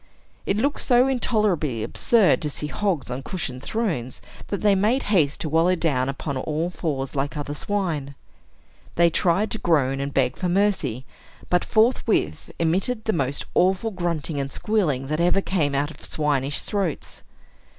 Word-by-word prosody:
It 195 - +1
looked 280 +6 0
so 250 0 +4
intolerably 210 - +1
absurd 210 - +3
to 150 - -1
see 150 - -5
hogs 165 -5 -2
on 125 +2 -3
cushioned 135 -6 -5
thrones, 165 - -2 0.3
that 200 - -3
they 205 -1 +4
made 215 +8 +2
haste 155 -1 +2
to 165 - -1
wallow 165 +4 +3
down 135 -7 0
upon 140 0 -4
all 155 +6 -2
fours, 140 -6 -3
like 145 +3 -2
other 145 0 -4
swine. 155 -6 -2 0.8
They 170 0 +4
tried 185 +6 +1
to 220 - -2
groan 135 -5 +2
and 140 +1 -3
beg 130 -2 +1
for 180 - -1
mercy, 175 - 0 0.5
but 180 0 +3
forthwith 220 - +1
emitted 195 +8 0
the 220 - +1
most 140 -3 -1
awful 190 +5 +2
grunting 170 -5 -2
and 140 0 -3
squealing 160 -12 0
that 155 +4 -1
ever 175 +3 +3
came 160 -8 0
out 145 +2 0
of - - -15
swinish 145 -2 0
throats. 195 -7 -3
165 Hz, 160 wpm, -24 LUFS, 140-200 Hz, 0.8 s, so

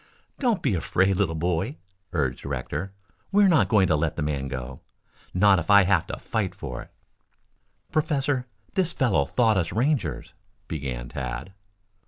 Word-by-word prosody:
"Don't 240 -7 +1
be 130 - +2
afraid, 95 +2 +1
little 90 -5 +1
boy," 80 -1 -1 0.3
urged 70 -7 -1
Rector. 70 +7 -4 0.4
"We 205 +1 +5
are - - +6
not 165 -6 +4
going 105 -4 +5
to 80 - +3
let 75 +1 0
the 80 - -2
man 70 -2 -2
go 65 -1 -6 0.5
not 95 0 +5
if 85 - -6
I 100 -1 +8
have 95 +1 +2
to - - -5
fight - - -2
for - - -6
it." - - -13 1.0
"Professor, 145 -4 0 0.3
this 180 -3 0
fellow 100 - +2
thought 110 - +2
us 85 - -1
Rangers," 115 - -1 0.3
began 65 -6 -4
Tad. 65 +8 -5
90 Hz, 160 wpm, -25 LUFS, -, 1.0 s, I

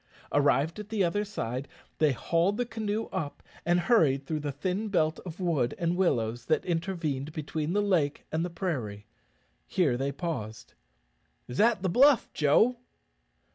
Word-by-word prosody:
Arrived 145 +5 +2
at 210 0 -8
the 215 -3 +1
other 185 +4 +1
side, 130 - -4 0.3
they 155 -2 +4
hauled 170 - +1
the 245 - 0
canoe 220 -1 -2
up 145 -2 -4 0.2
and 175 0 +3
hurried 145 - +3
through 155 +2 -2
the 145 -1 -3
thin 185 +9 -2
belt 160 -5 +1
of 175 +1 -8
wood 155 -10 0
and 170 0 0
willows 120 -10 0
that 155 - +1
intervened 165 -5 -2
between 155 +1 -3
the 205 +1 +2
lake 165 -8 +1
and 160 +1 0
the 175 - -2
prairie. 130 - -4 0.6
Here 145 -10 +2
they 135 +2 -1
paused. 125 -11 -5 0.7
"Is 125 - -6
that 220 -3 +4
the - - +2
bluff, 265 +7 +5
Joe?" 215 - +3
165 Hz, 160 wpm, -29 LUFS, 140-195 Hz, 0.7 s, bluff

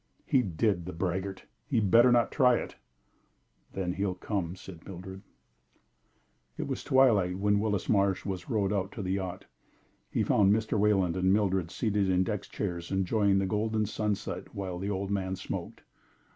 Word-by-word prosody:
"He 130 - +3
did, 95 -2 0
the 90 - -5
braggart! 95 +2 -3 0.2
He 140 - -3
had 105 -4 +1
better 120 +4 +7
not 120 -2 +3
try 125 -4 +4
it." - - -4 1.0
"Then 90 -2 -2
he'll 95 -1 -1
come," 90 -2 -3
said 90 -3 -11
Mildred. 95 +1 -9 1.4
It - - -3
was - - -4
twilight 105 -9 +3
when 100 +1 +2
Willis 105 -3 -1
Marsh 100 -3 +2
was 95 -3 -5
rowed 105 -3 +1
out 95 0 -1
to 105 - -5
the 90 - -2
yacht. 95 -2 -3 0.6
He - - 0
found 100 -2 +4
Mr. 110 +1 +1
Wayland 100 -4 +2
and 95 0 +2
Mildred 95 -4 +1
seated 105 -1 0
in 90 0 +3
deck 105 +1 -2
chairs 85 -4 -4
enjoying 95 +1 +2
the 95 - +1
golden 110 +2 0
sunset 105 0 -3
while 95 -3 -4
the 100 +2 -3
old 100 0 -2
man 95 -2 -1
smoked. 95 - -6
100 Hz, 170 wpm, -29 LUFS, 95-105 Hz, 1.4 s, better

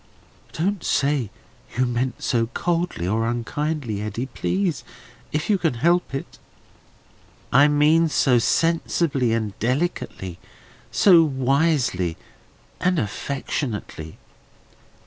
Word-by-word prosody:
"Don't 190 +3 -1
say 140 -6 +1 0.5
you 130 - +3
mean 125 +1 -1
so 115 -2 0
coldly 170 - -2
or 110 +4 0
unkindly, 120 -1 -2
Eddy, 110 +4 -3
please, 175 +5 -2 0.5
if 150 +1 -1
you 205 -3 +2
can 160 -7 0
help 170 +3 +1
it." 135 - -7 1.1
"I 140 +3 +7
mean 155 +3 +4
so 125 -4 +3
sensibly 165 -3 +1
and 110 -3 -1
delicately, 120 - -2 0.5
so 180 -5 +6
wisely 135 - +1 0.6
and 180 0 +1
affectionately." 110 - -4
135 Hz, 100 wpm, -23 LUFS, 115-165 Hz, 1.1 s, I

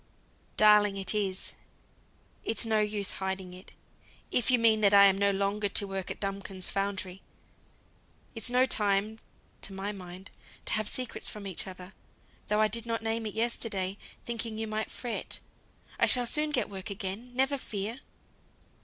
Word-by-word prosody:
"Darling, 210 -1 +6
it 195 +2 +4
is; 195 -3 -2 0.9
it's 225 - +3
no 220 -1 +2
use 210 -1 0
hiding 190 -1 -4
it 185 +1 -13 0.6
if 245 - +2
you 255 - +5
mean 225 -2 +4
that 200 -1 +5
I'm 200 -1 +8
no 200 +1 +2
longer 200 +1 0
to 200 - +4
work 195 -1 -4
at - - -5
Duncombe's 195 -2 -4
foundry. 195 -1 -2 1.1
It's 225 +1 0
no 250 +1 +4
time 210 -2 +1 0.4
(to 195 - -2
my 195 +2 -3
mind) 185 -1 -10 0.3
to - - +1
have 215 -1 +1
secrets 255 -2 -2
from 210 -1 -6
each 190 0 -4
other, 185 0 -9 0.5
though 210 +1 +2
I 215 - +5
did 230 +2 -2
not 230 -1 -2
name 225 0 -1
it 210 - -7
yesterday, 210 -4 -1 0.3
thinking 230 -2 -3
you 220 - -2
might 215 0 -3
fret. 240 -2 -3 0.6
I - - +5
shall 245 -1 +6
soon 300 +5 +1
get 290 -4 0
work 195 -1 -7
again, 200 +4 -5
never 270 +2 +1
fear." 215 +2 -4
210 Hz, 160 wpm, -29 LUFS, 195-225 Hz, 1.1 s, I'm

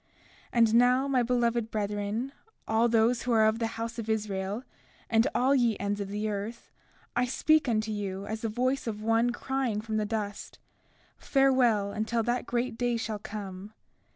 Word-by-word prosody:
33:13 - - -40 0.5
And 230 -2 +4
now, 250 +3 +4
my 265 -2 +2
beloved 235 -2 +1
brethren, 210 +4 -2 0.4
all 225 +2 +3
those 230 +1 +3
who 250 - -2
are 220 -1 +5
of 220 +1 +2
the 230 - 0
house 230 +1 -4
of 225 -1 -5
Israel, 205 0 -2 0.5
and 225 +3 +4
all 260 +3 +3
ye 240 -5 +2
ends 205 +1 -2
of 200 - -3
the 210 +2 -3
earth, 210 +3 -5 0.4
I 245 +1 +2
speak 300 +3 +2
unto 220 -1 0
you 200 -2 -4
as 220 +1 -4
the 225 - -1
voice 255 +4 -1
of 215 -1 -4
one 225 +2 +3
crying 255 -3 -1
from 220 0 -3
the 210 -1 0
dust: 205 -2 -4 0.6
Farewell 250 -7 +3
until 220 +2 -1
that 240 +2 -1
great 240 -1 -2
day 245 -1 +1
shall 220 -2 -3
come. 200 0 -7
225 Hz, 180 wpm, -29 LUFS, 210-245 Hz, 0.6 s, are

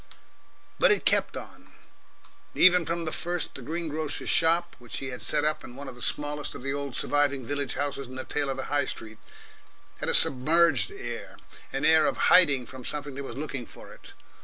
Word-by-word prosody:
But - - +6
it 415 - +1
kept - - +2
on. - - -11 0.8
Even 180 -2 +6
from 170 0 -2
the 155 - -2
first 175 0 -2
the - - -7
green 165 +6 -3
grocer's 155 0 -2
shop 170 +1 +3
which 120 -1 -6
he 135 - -4
had 125 - -7
set 150 -1 +1
up 155 - 0
in 125 - -10
one 140 +1 -8
of 130 - -7
the 125 - -14
smallest 150 +1 -3
of - - -9
the 135 0 -1
old 140 -3 -4
surviving 140 -3 +1
village 145 +1 -2
houses 140 -2 -3
in 130 - -10
the 130 - -4
tail 145 -2 -2
of 135 - -2
the 135 - -3
High 145 -2 +2
Street 110 -1 -7 0.8
had - - -3
a - - +3
submerged 160 - +4
air, 395 -1 -7 0.3
an - - -1
air 160 0 +5
of - - -1 0.2
hiding 145 -8 +6
from 130 0 -10
something 145 +1 -4
that 140 +1 -6
was 130 -2 -7
looking 135 -4 -5
for - - -12
it. - - -14
145 Hz, 210 wpm, -27 LUFS, 135-160 Hz, 0.8 s, But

